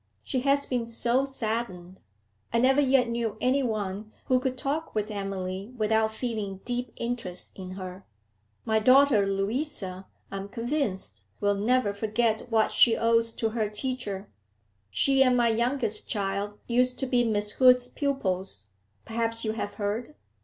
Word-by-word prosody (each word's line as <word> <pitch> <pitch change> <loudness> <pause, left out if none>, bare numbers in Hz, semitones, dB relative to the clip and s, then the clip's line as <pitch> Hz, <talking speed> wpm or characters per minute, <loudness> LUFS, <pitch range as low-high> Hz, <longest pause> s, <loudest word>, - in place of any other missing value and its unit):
She 260 - -1
has 280 +2 +2
been 245 -3 -2
so 235 +3 +1
saddened. 220 -8 -4 0.5
I 230 - +1
never 265 +4 +4
yet 265 -3 +4
knew 235 -2 -2
any 265 +2 +2
one 215 -3 -3
who 255 -1 +3
could 255 0 -2
talk 285 +3 -3
with 215 0 -1
Emily 195 +2 -4
without 220 0 +2
feeling 220 -4 -4
deep 245 -1 -3
interest 230 -7 -4
in 185 -1 -8
her. 185 0 -8 0.6
My 220 0 +2
daughter 255 -3 +5
Louisa, 195 -2 -2 0.2
I 195 - -4
am 195 +1 -6
convinced, 230 - -3 0.2
will 205 0 +2
never 210 +1 +1
forget 220 +2 0
what 220 -2 +2
she 230 -2 +5
owes 230 0 +3
to 225 - -1
her 220 -2 -1
teacher 210 -3 -3 0.6
She 270 - +3
and 255 -2 +5
my 240 -1 +3
youngest 235 -1 +1
child 200 0 -2
used 250 +1 +2
to 265 - -1
be 250 -1 +2
Miss 210 -2 +1
Hood's 250 0 +5
pupils 190 - -3 0.3
perhaps 230 0 +1
you 215 - +1
have 215 -2 -4
heard? 220 +7 -3
225 Hz, 155 wpm, -27 LUFS, 200-250 Hz, 0.6 s, daughter